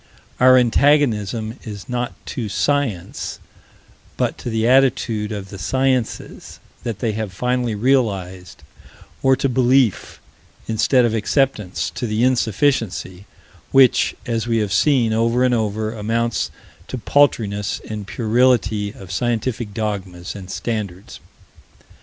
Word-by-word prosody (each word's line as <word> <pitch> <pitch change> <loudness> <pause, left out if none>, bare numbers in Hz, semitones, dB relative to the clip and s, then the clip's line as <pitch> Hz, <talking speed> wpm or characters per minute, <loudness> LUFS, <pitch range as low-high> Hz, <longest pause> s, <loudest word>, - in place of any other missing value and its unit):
Our 130 0 +7
antagonism 120 -4 +2
is 105 -4 -8
not 125 -1 -2
to 115 -4 -4
Science, 135 -5 -1 0.8
but - - 0
to - - -5
the 110 0 0
attitude 120 -4 +2
of 100 -2 -6
the 100 - -9
sciences 130 +4 -2 0.2
that 115 -4 -4
they 115 0 -1
have 105 -2 -4
finally 125 +2 -1
realized; 100 - -1 0.6
or 135 0 +4
to 135 - 0
belief, 130 -3 +2 0.5
instead 115 +3 +3
of 115 - 0
acceptance; 110 -3 0
to 120 - -4
the 110 +2 0
insufficiency, 115 -6 0 0.4
which, 135 -2 +4
as 115 -1 -2
we 115 -1 +1
have 105 -4 -1
seen 120 - +3
over 115 +2 +2
and 125 -1 +3
over, 110 -1 -1
amounts 115 0 -1 0.4
to 130 - -5
paltriness 110 -7 +1
and 105 -2 -6
puerility 110 -3 +1
of 95 -3 -12
scientific 120 +1 -2
dogmas 100 -5 -4
and 95 -2 -9
standards. 100 -4 -5
115 Hz, 125 wpm, -20 LUFS, 105-125 Hz, 0.8 s, Our